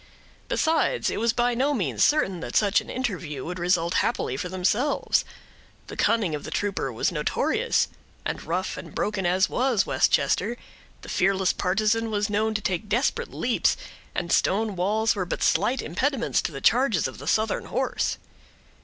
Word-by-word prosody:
Besides, 325 +9 +1
it - - -3
was 230 +1 +2
by 240 +1 +1
no 275 +4 +1
means 135 - 0
certain 195 - +2
that - - -6
such 205 -1 +4
an - - -13
interview 175 - -3
would 180 +1 -5
result 175 -1 +1
happily 235 - -1
for 180 - -4
themselves. 195 +10 +1 0.7
The - - -7
cunning 220 -8 +2
of 150 - -4
the - - -6
trooper 200 -10 -2
was 115 - 0
notorious; - - +1 0.4
and - - -3
rough 180 +4 -2
and - - -9
broken 200 -3 -1
as 185 +2 +3
was 245 -5 +1
Westchester, 240 - +1 0.5
the - - -9
fearless 190 -1 +2
partisan 215 +4 +1
was 210 0 -1
known 215 +1 +1
to 215 - 0
take 190 +2 -2
desperate 240 +6 0
leaps, - - +1 0.4
and 170 -1 -2
stone 210 +1 +2
walls 215 +5 +1
were 195 - -1
but 180 - -3
slight 210 +9 +2
impediments 245 - 0
to - - -3
the 135 -2 -7
charges 235 - +3
of 130 - -9
the 140 - -9
Southern 220 +5 +1
horse. - - -1
205 Hz, 170 wpm, -25 LUFS, 180-230 Hz, 0.7 s, such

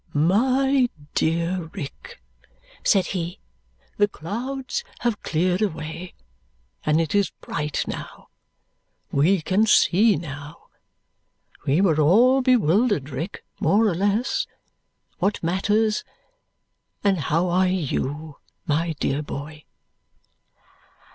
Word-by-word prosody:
"My 255 - +3 0.2
dear 170 +1 0
Rick," 195 - -8 0.6
said 195 -4 +3
he, 175 +1 -4 0.6
"the 205 - +4
clouds 255 - -4 0.2
have 235 -4 -1
cleared 180 +4 0
away, 170 -2 -4 0.7
and 155 +1 +2
it 165 -3 -1
is 200 -1 +3
bright 150 -1 -2
now. - - -7 0.8
We 160 +5 +3
can 205 +6 +2
see 210 +1 +5
now. 145 0 -8 1.0
We 145 +7 +3
were 160 -6 +3
all 240 - +5
bewildered, 210 - +2
Rick, 155 +9 -5 0.2
more 215 +3 +3
or 200 - +1
less. 205 +7 0 0.7
What 200 0 0
matters! 210 +5 +1 1.0
And 195 -3 +2
how 165 +5 +1
are 185 +2 +3
you, 155 -3 -2 0.3
my 165 +1 0
dear 140 +2 0
boy?" 150 +1 -7
180 Hz, 100 wpm, -23 LUFS, 155-210 Hz, 1.0 s, see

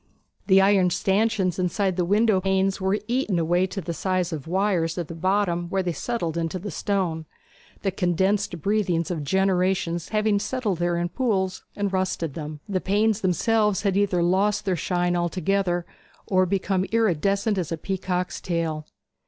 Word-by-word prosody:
The 195 -1 +6
iron 195 -2 +4
stanchions 195 0 +1
inside 185 +1 0
the 180 - +1
window 205 +1 +3
panes 190 0 +1
were 190 +2 +1
eaten 240 -6 0
away 175 +3 +2
to 195 +1 -5
the 170 -1 -4
size 185 0 -1
of 150 -1 -6
wires 180 -2 0
at 170 -3 -3
the - - -5
bottom 175 0 0
where 190 0 0
they 175 -2 -1
entered 170 -7 -2
the 205 - -4
stone, 170 -3 -1 0.6
the 195 - +1
condensed 185 -1 0
breathings 185 -5 +1
of 160 -4 -3
generations 185 0 +1
having 215 -1 +2
settled 210 -4 -2
there 175 0 +1
in 175 0 -1
pools 190 -3 -1
and 200 -1 -2
rusted 185 -5 -1
them. 150 -1 -7
The 190 -3 -1
panes 210 +2 +1
themselves 210 +2 +1
had 195 -2 +1
either 195 -3 +2
lost 195 +5 +1
their 190 -2 +1
shine 175 +1 0
altogether 175 +1 0 0.4
or 185 -1 +2
become 190 0 0
iridescent 200 -1 +1
as 170 -3 -3
a 165 - -1
peacock's 180 -1 -3
tail. 160 -3 -2
185 Hz, 160 wpm, -24 LUFS, 175-200 Hz, 0.6 s, The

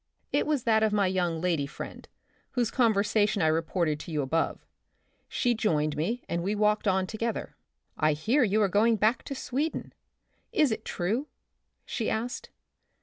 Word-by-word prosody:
It - - +2
was 295 -5 +1
that 220 -2 +3
of 220 -1 +3
my 205 -1 +2
young 180 -3 0
lady 165 -6 0
friend, - - -9 0.4
whose 240 -3 0
conversation 210 -4 +2
I - - +4
reported 160 -1 0
to 165 - -8
you 150 -2 0
above. 160 +5 -1 0.6
She 245 -2 +1
joined 155 -10 0
me 220 +11 -2
and 170 - -1
we 200 +4 -1
walked 210 0 +2
on 190 -1 +2
together. 225 +4 -3 0.2
" - - -52
I 155 0 +3
hear 230 - +2
you 215 0 +3
are - - +4
going 215 +4 +3
back 220 +4 +2
to 275 - -5
Sweden; 280 +5 -3 0.6
is 305 - +3
it 220 - -3
true? 220 +12 -1 0.6
she 225 - -2
asked. 230 +3 -3
210 Hz, 170 wpm, -28 LUFS, 170-230 Hz, 0.6 s, I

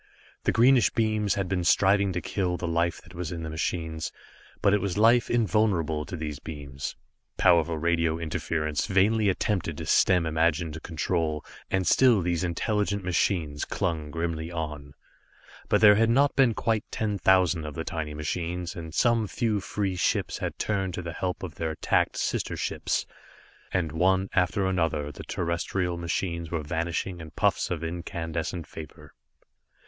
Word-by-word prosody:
The - - +4
greenish 125 +1 +5
beams 110 -2 +1
had 100 -2 -1
been 90 -1 -1
striving 100 +2 +4
to 90 - -2
kill 90 -3 -1
the 90 - -4
life 85 +1 0
that 85 0 -16
was 85 -2 -4
in 85 -1 -5
the 80 - -5
machines, 80 0 -3 0.5
but 100 - +3
it 105 - +3
was 100 -2 -2
life 115 +3 +5
invulnerable 100 -9 +1
to 90 - -5
these 75 -3 -5
beams. 70 -3 -6 0.4
Powerful 85 -1 +4
radio 85 0 +1
interference 80 -2 -2
vainly 105 +2 +3
attempted 90 -4 -1
to - - -5
stem 90 -3 +4
imagined 80 0 0
control, 80 -2 -2 0.2
and 95 -1 0
still 120 +4 +5
these 85 0 0
intelligent 100 +3 -1
machines 85 -4 0
clung 80 -3 -2
grimly 80 +1 -3
on. 75 -4 -5 0.7
But - - +3
there 105 -1 +9
had 115 +2 +3
not 140 +4 +3
been 125 -5 +4
quite 110 -2 0
ten 105 -2 -2
thousand 90 -3 +3
of 75 - -6
the 80 - -3
tiny 75 -3 -4
machines, 85 +4 -3
and 80 -2 -7
some 115 -3 +3
few 110 -1 0
free 100 -1 -2
ships 90 - 0
had - - -4
turned 95 -4 -1
to 90 - -5
the 85 -1 -5
help 90 +2 -3
of 90 -5 -5
their 80 -1 -3
attacked 80 - 0
sister - - -1
ships. - - -1 0.7
And 85 -4 0
one 95 +4 +2
after 95 +2 +2
another 80 -6 0
the - - -10
terrestrial 85 +1 -2
machines 85 -1 -3
were 80 -2 -2
vanishing 85 +3 -2
in 80 -1 -8
puffs - - +1
of 85 -2 -3
incandescent 85 0 -4
vapor. 75 +1 -11
85 Hz, 165 wpm, -27 LUFS, 80-100 Hz, 0.7 s, there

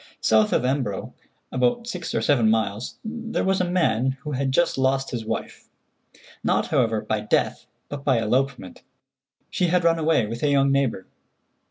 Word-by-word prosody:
South 110 -1 +3
of - - +1
Embro, 130 -7 -2 0.4
about 130 - +1
six 185 -7 -5
or - - 0
seven 120 -6 +3
miles, 110 0 -1
there 230 0 -3
was 190 0 +1
a 180 - -1
man 135 -7 +1
who 150 - -6
had 135 -1 -1
just 175 +5 +2
lost 135 0 0
his 120 -2 -3
wife—not, 115 +1 -5
however, 110 -2 +1
by 110 - -2
death, 105 - -1 0.2
but 145 -1 -7
by 130 -4 +2
elopement. 125 -1 -1 0.7
She 180 - +1
had 180 +1 +2
run 165 0 +3
away 160 -7 +2
with 115 +3 -6
a 150 - +2
young 140 -1 +3
neighbor. 135 -8 0
135 Hz, 165 wpm, -24 LUFS, 115-160 Hz, 0.7 s, South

